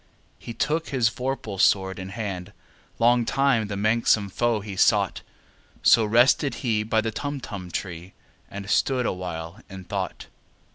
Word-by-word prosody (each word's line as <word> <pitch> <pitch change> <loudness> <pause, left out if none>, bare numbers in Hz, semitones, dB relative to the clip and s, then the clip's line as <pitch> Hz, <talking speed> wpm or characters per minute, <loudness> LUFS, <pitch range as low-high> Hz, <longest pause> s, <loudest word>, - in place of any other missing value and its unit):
He 115 - -8
took 160 +3 -1
his 125 -5 +2
vorpal 125 -6 -4
sword 95 0 +2
in 95 0 -6
hand: 95 -4 -5 0.4
Long 120 +1 +4
time 130 -3 +1
the 100 -1 -4
manxome 110 -1 +2
foe 120 0 0
he 100 -1 -7
sought— - - +2 0.6
So 115 - +6
rested 120 +6 +3
he 110 -3 +2
by 110 +1 +1
the 110 0 -2
Tumtum 115 -9 -5
tree, 90 +1 -6 0.4
And 100 -1 -7
stood 125 +4 +1
awhile 90 0 -4
in 95 -1 -9
thought. - - -4
110 Hz, 145 wpm, -25 LUFS, 95-120 Hz, 0.6 s, So